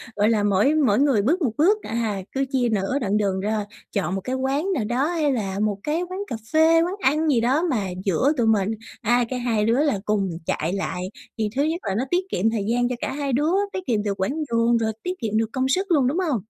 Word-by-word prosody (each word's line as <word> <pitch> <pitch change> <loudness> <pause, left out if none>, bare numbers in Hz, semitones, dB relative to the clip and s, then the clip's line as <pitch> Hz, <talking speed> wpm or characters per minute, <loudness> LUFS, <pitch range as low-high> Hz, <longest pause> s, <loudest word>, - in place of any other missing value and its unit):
gọi 210 +2 +3
là, 215 -3 +2
mỗi 205 +9 +3
mỗi 260 -8 +3
người 275 -8 +3
bước 325 - +1
một 255 -8 +1
bước, 405 +8 +3
à, 220 -4 -2
cứ 270 0 0
chia 250 -3 +1
nửa 215 +6 0
đoạn 210 -3 0
đường 195 -2 0
ra, 210 +1 -1 0.3
chọn 195 -2 -1
một 195 - -3
cái 255 - -2
quán 275 +8 0
nào 250 - -1
đó 245 +6 0
hay 315 -4 +1
là 200 -5 -2
một 210 -2 0
cái 310 +3 -1
quán 370 - -5
cà - - -4 0.2
phê, 325 +1 +5
quán 360 +3 -1
ăn 310 0 +2
gì 245 -5 +3
đó 265 +7 +2
mà 215 -9 0 0.2
giữa 200 - +2
tụi 235 - +2
mình. 215 -1 +2 0.3
À, 240 +2 +3
cái 255 -1 -3
hai 225 -4 0
đứa 240 +6 +3
là 275 -10 +1
cùng 200 -3 0 0.2
chạy 165 +4 -1
lại 195 -2 -3 0.4
thì 215 -1 0
thứ 280 - +2
nhất 320 +3 -1
là 195 - -1
nó 235 - 0
tiết 360 +1 +1
kiệm 215 +5 +1
thời 225 -3 -2
gian 245 +1 +1
cho 250 - -2
cả - - -3
hai 280 -2 -2
đứa, 300 +6 +2 0.2
tiết 375 - -2
kiệm 220 -4 +1
được 205 -1 -1
quãng 190 +9 -1 0.2
đường 230 0 +3
rồi 220 -1 0
tiết 360 - -2
kiệm 215 -1 -1
được 225 0 0
công 260 0 0
sức 380 +7 0
luôn, 280 -6 +4
đúng 290 +7 0
hông? 315 -10 +1
240 Hz, 260 wpm, -23 LUFS, 210-290 Hz, 0.4 s, phê